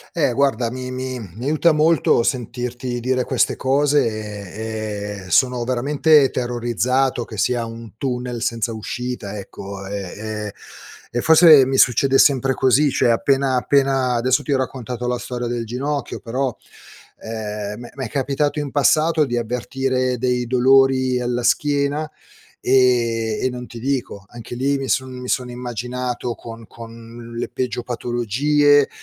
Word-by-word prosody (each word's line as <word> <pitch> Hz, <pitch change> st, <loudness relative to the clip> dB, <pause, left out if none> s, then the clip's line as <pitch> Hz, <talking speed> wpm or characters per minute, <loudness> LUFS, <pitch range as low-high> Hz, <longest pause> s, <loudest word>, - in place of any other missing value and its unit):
Eh 150 Hz, -6 st, +2 dB
guarda, 130 Hz, -3 st, +1 dB
mi 130 Hz, 0 st, -6 dB
mi 130 Hz, 0 st, -4 dB, 0.2 s
mi 120 Hz, -, -7 dB
aiuta 155 Hz, +3 st, +3 dB
molto 155 Hz, -5 st, +3 dB
sentirti 125 Hz, +1 st, -3 dB
dire 130 Hz, +1 st, 0 dB
queste -, -, +1 dB
cose, 145 Hz, +2 st, +2 dB
e 105 Hz, -1 st, -5 dB
e -, -, -11 dB
sono 125 Hz, -2 st, +3 dB
veramente 140 Hz, +3 st, +3 dB
terrorizzato 120 Hz, +1 st, 0 dB
che 110 Hz, -, -10 dB
sia 120 Hz, +3 st, 0 dB
un 115 Hz, -2 st, -10 dB
tunnel 125 Hz, -2 st, -3 dB
senza 115 Hz, -1 st, -1 dB
uscita, 110 Hz, -1 st, -5 dB
ecco 100 Hz, 0 st, -8 dB
e 100 Hz, +1 st, -5 dB, 0.2 s
e 105 Hz, -1 st, -5 dB, 0.6 s
e 120 Hz, -, -1 dB
forse 160 Hz, -3 st, +7 dB
mi 135 Hz, +1 st, -1 dB
succede 135 Hz, +2 st, +4 dB
sempre 135 Hz, -2 st, +4 dB
così, 135 Hz, +3 st, +3 dB
cioè 125 Hz, -, +2 dB
appena 135 Hz, +3 st, +2 dB
appena 135 Hz, -1 st, +2 dB
adesso 130 Hz, +4 st, +1 dB
ti 145 Hz, -, -4 dB
ho -, -, +3 dB
raccontato 125 Hz, -2 st, -4 dB
la 125 Hz, 0 st, 0 dB
storia 120 Hz, 0 st, -5 dB
del 120 Hz, -1 st, -3 dB
ginocchio, 135 Hz, +4 st, -3 dB
però, 125 Hz, +1 st, -2 dB, 0.7 s
ehm, 105 Hz, -2 st, -5 dB
m'è 120 Hz, -, -10 dB
m'è 135 Hz, -3 st, -5 dB
capitato 140 Hz, +5 st, -1 dB
in 145 Hz, -2 st, -3 dB
passato 155 Hz, +3 st, +3 dB
di 120 Hz, -3 st, -2 dB
avvertire 125 Hz, +2 st, -1 dB
dei 125 Hz, 0 st, 0 dB
dolori 130 Hz, 0 st, +3 dB
alla 120 Hz, 0 st, -1 dB
schiena, 145 Hz, +4 st, +1 dB, 0.5 s
ehm, 120 Hz, -4 st, +2 dB
e -, -, +3 dB
non 125 Hz, 0 st, -7 dB
ti 120 Hz, -, -10 dB
dico. 125 Hz, -6 st, -3 dB
Anche 120 Hz, +1 st, -9 dB
lì 140 Hz, +3 st, 0 dB
mi 135 Hz, -1 st, -4 dB
son 130 Hz, +1 st, 0 dB
mi 125 Hz, 0 st, -8 dB
sono 125 Hz, -1 st, -1 dB
immaginato 125 Hz, 0 st, -4 dB
con 115 Hz, -1 st, -10 dB
con 115 Hz, +1 st, -11 dB
le 120 Hz, -, -3 dB
peggio 125 Hz, -1 st, -3 dB
patologie, 135 Hz, +5 st, +2 dB
125 Hz, 150 wpm, -20 LUFS, 115-135 Hz, 0.7 s, forse